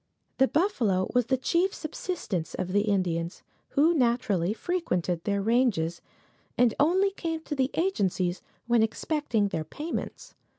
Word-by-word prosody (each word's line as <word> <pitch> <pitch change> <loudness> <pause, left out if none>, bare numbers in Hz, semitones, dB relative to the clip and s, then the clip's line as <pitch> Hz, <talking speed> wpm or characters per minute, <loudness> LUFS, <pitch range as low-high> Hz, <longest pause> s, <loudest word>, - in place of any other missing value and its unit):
The 265 - +6
buffalo 235 - +1
was 245 -2 +2
the 260 - +2
chief 345 +9 +1
subsistence 300 - -4
of 185 - -3
the 205 +2 +2
Indians, 175 -4 -1 0.3
who 315 +4 +5
naturally 235 - +1
frequented 185 - -1
their 200 -1 0
ranges, 210 -8 +1 0.6
and 245 -3 +4
only 375 +7 +3
came 330 -4 -4
to 315 - -5
the 265 -2 +1
agencies 190 - 0 0.2
when 235 -1 +3
expecting 225 -2 0
their 160 -4 -2
payments. 300 - -6
235 Hz, 135 wpm, -27 LUFS, -, 0.6 s, The